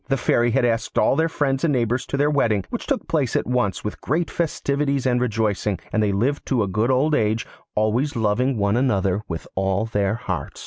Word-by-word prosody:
The 135 - +1
Fairy 120 -1 +2
had 120 +1 +2
asked 115 -1 -1
all - - +4
their 165 +1 +2
friends 135 -4 -1
and 165 - +3
neighbours 125 -1 0
to 140 - -2
their 145 +1 +2
wedding, 110 -9 +1
which - - -4
took - - -1
place - - 0
at - - +1
once 125 -6 0
with 105 - -5
great 165 +5 -1
festivities 140 -4 -1
and 125 -1 +2
rejoicings, 105 -4 0
and 110 - +2
they 105 -1 +2
lived 125 +9 0
to 125 -5 +2
a - - -2
good 105 +5 0
old 135 +4 +2
age, 110 -3 +1 0.3
always 115 +7 +1
loving 115 +4 +1
one 100 0 +1
another 100 -6 +1
with 80 -2 -5
all 95 +2 0
their 105 -2 0
hearts. 90 - -5
120 Hz, 215 wpm, -22 LUFS, 105-135 Hz, 0.3 s, all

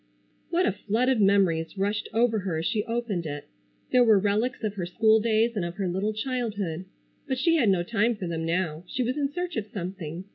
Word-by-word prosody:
What 350 +2 +2
a - - +3
flood 220 +6 0
of 255 -5 +2
memories 195 -4 +2
rushed 205 +2 -1
over 225 -1 +2
her 185 -4 -2
as 160 - -3
she 210 +2 0
opened 230 -8 -2
it! 145 -1 -6 0.5
There 250 - +6
were 220 -3 +6
relics 210 +6 0
of 210 -2 -1
her 185 -4 -4
school 220 +5 +4
days, 225 +1 +2
and 200 - -1
of 170 0 -4
her 195 -2 -2
little 190 +4 -1
childhood. 215 -7 -3 0.4
But 260 - -1
she 330 +5 +3
had 240 -9 +3
no 185 -3 +2
time 230 +4 +1
for 200 -3 -5
them 165 -1 -3
now. 165 -1 -1
She 255 - -2
was 250 +2 -1
in 285 -2 -1
search 355 -1 -4
of 215 -1 -2
something. 180 -4 -6
210 Hz, 220 wpm, -26 LUFS, 180-235 Hz, 0.5 s, There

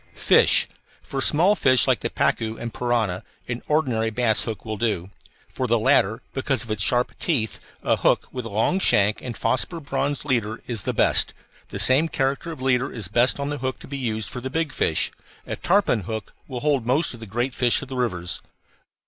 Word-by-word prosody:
FISH - - +5 0.4
For 135 - -4
small 175 +10 +5
fish 130 - +4
like - - +2
the - - -2
pacu 110 0 -1
and 115 -1 -6
piranha 115 -7 -1 0.2
an 120 0 -4
ordinary 125 -8 +1
bass 110 -1 +1
hook 110 -3 -6
will 110 -1 -4
do. 100 -4 -2 0.4
For - - -3
the - - +3
latter, - - +2
because - - -1
of 115 - -8
its 110 -2 -2
sharp 125 +4 +2
teeth, 125 -10 -1 0.2
a - - +2
hook - - +2
with 125 -2 -6
a - - -5
long 110 - +1
shank 105 - +3
and 120 -3 -6
phosphor 125 +9 0
bronze 140 -1 -2
leader 115 -5 -1
is 115 -5 -3
the - - 0
best; - - +3 0.3
the - - -5
same 135 +5 +4
character 140 +2 -2
of 130 -5 -8
leader 130 0 +1
is 105 -7 -5
best 120 +6 +2
on 140 0 -2
the 145 - -4
hook 130 +1 -3
to - - -11
be 140 - -6
used 110 -5 -2
for 125 - -6
the 130 - -4
big 160 +1 -1
fish. 80 - +1 0.3
A - - -4
tarpon 185 - +2
hook 110 +2 -6
will 125 -3 -6
hold 145 -4 +1
most 130 +7 +1
of 120 - -11
the 110 - -9
great 120 +5 -2
fish 120 +2 +2
of - - -8
the 130 - -7
rivers. 90 -9 -1
125 Hz, 210 wpm, -23 LUFS, 110-135 Hz, 0.4 s, FISH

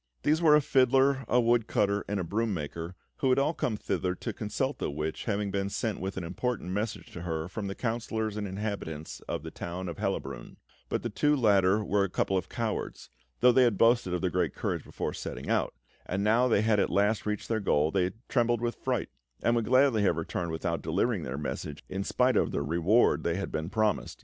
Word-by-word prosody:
These 155 +3 +2
were 155 -3 +7
a 150 - +5
fiddler, 135 0 +3
a 125 - +3
woodcutter, 115 -4 +2
and 105 -1 -1
a - - -1
broom 105 +4 -1
maker, 85 +3 -5 0.2
who 135 - +1
had 130 - +4
all 140 +4 +2
come 115 -8 -1
thither 90 -2 -1
to 115 +4 -5
consult 115 +7 -2
the - - -1
witch, 75 +2 -4
having 100 -2 -1
been 100 0 -1
sent 110 +1 -2
with 95 +1 -4
an 95 - -3
important 95 +2 -3
message 105 +3 -3
to 85 - -8
her 80 -2 -3
from 100 +2 -5
the 95 - -4
councillors 110 -2 -2
and 105 -1 -3
inhabitants 95 -6 -5
of - - -3
the - - -7
town 90 +2 -5
of 85 - -6
Hellabrunn; 70 - -4 0.3
but - - -1
the - - -3
two 150 0 +2
latter 105 -4 +3
were 100 0 +2
a 100 - -1
couple 95 - 0
of 95 - -1
cowards - - -4 0.3
though 125 +1 +7
they 130 +2 +5
had 120 -5 +3
boasted 115 -4 +4
of 90 - -1
their 90 -2 0
great - - 0
courage - - -2
before - - -4
setting - - -5
out - - 0 0.3
and 95 +2 -1
now 115 +4 +4
that 120 - +3
they - - +3
had 110 -2 +3
at - - +2
last 105 +3 +1
reached 105 -1 -2
their 110 -1 0
goal, 80 -6 +2
they 90 -1 +2 0.2
trembled 120 -2 +2
with 120 0 -3
fright, 125 -4 -1 0.3
and 120 - +3
would 115 -2 +1
gladly 130 -2 +4
have 100 - +2
returned 85 +1 -3
without 80 0 -2
delivering - - 0
their 65 +2 -4
message, 75 - -5
in 95 +1 -2
spite 125 +4 +2
of - - +3
the 70 - -1
reward 85 +1 +3
they 85 - 0
had 100 - -3
been 80 +2 -3
promised. 110 +1 0
105 Hz, 225 wpm, -29 LUFS, 90-120 Hz, 0.3 s, were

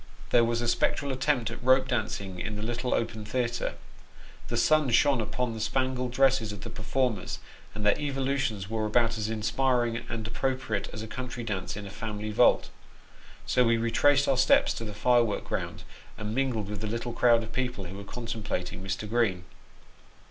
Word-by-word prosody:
There 120 - +6
was 115 0 0
a 120 - -1
spectral 140 +4 +1
attempt 130 -4 0
at 120 - -8
rope 130 +1 +4
dancing 100 -6 -2
in 105 +3 -3
the 105 - -5
little 120 +2 -2
open 110 -1 -2
theatre. 120 +2 -2 0.7
The - - -2
sun 155 -3 +4
shone 130 +1 +4
upon 120 +2 -2
the 110 - -6
spangled 130 +1 0
dresses 130 -4 +3
of 105 -1 -8
the - - -7
performers, 110 -1 -1 0.4
and 105 0 -3
their 105 - +5
evolutions 135 -8 -1
were 110 0 -1
about 115 +1 +2
as 110 0 -1
inspirit 120 +3 +1
ing 120 +1 -5
and 115 -2 -4
appropriate 130 -2 -2
as 110 - -6
a - - -6
country 125 +1 -5
dance 100 -4 -3
in 105 - -6
a 100 - -8
family 105 0 -4
vault. 120 +3 +4 0.7
So 125 - +3
wo 115 -1 +4
retraced 135 +5 +3
our 135 - +3
steps 130 - +4
to 115 - -5
the 105 -1 -7
firework 120 -1 +2
ground, - - -4 0.3
and 105 0 -4
mingled 125 -5 0
with 105 0 -5
the 110 - -2
little 115 +2 -3
crowd 115 -1 +4
of 110 +1 -9
people 125 -5 -2
who 95 +1 -7
were 100 - -7
contemplating 105 -5 -4
Mr. 95 +2 -3
Green. 105 -6 +1
115 Hz, 185 wpm, -28 LUFS, 105-130 Hz, 0.7 s, There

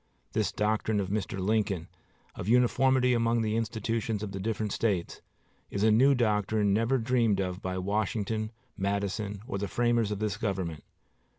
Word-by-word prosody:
This 110 -2 +1
doctrine 105 0 0
of 95 -2 -2
Mr. 105 -1 -2
Lincoln, 95 -3 0 0.5
of - - -6
uniformity 125 +2 +4
among 115 -1 +2
the 110 0 0
institutions 115 -1 -2
of 105 - -4
the 95 - -5
different 110 +1 -2
States, 95 -7 -1 0.5
is 100 - -2
a 110 - +5
new 135 +6 +5
doctrine 105 -3 +2
never 115 +5 +2
dreamed 115 -4 +2
of 90 0 -2
by 95 0 -3
Washington, 110 +2 -1 0.2
Madison, 100 +1 -2
or 120 -6 -3
the 100 - -2
framers 120 -1 +1
of 105 - -2
this 105 -1 -2
government. 95 -8 -3
105 Hz, 160 wpm, -29 LUFS, 100-115 Hz, 0.5 s, a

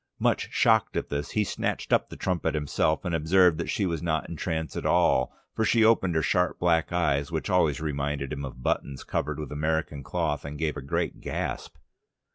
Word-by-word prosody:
Much - - +1
shocked - - +3
at - - -2
this, 70 0 -3
he 105 - +4
snatched - - -2
up - - +2
the - - -8
trumpet 85 -4 -1
himself, 75 +3 0
and 90 - -1
observed 85 +1 +4
that 85 - -3
she 100 - 0
was 85 -4 -2
not 80 -2 -1
in 85 - -6
trance 80 0 -3
at - - -3
all, 80 -5 +3 0.2
for 110 - +1
she 115 0 +4
opened 95 -6 +3
her 80 - +2
sharp 90 +2 +1
black 85 -1 +2
eyes, 75 -4 +1
which 80 +5 -2
always 80 -6 +3
reminded 70 -2 -2
him 70 - -5
of 65 -2 -8
buttons 70 -2 -1
covered 75 -1 -2
with 75 -3 -6
American 75 -1 -1
cloth, 75 0 -2
and 70 +1 -6
gave 80 -1 -1
a - - -5
great 70 - -2
gasp. - - -4
80 Hz, 205 wpm, -27 LUFS, 75-85 Hz, 0.2 s, he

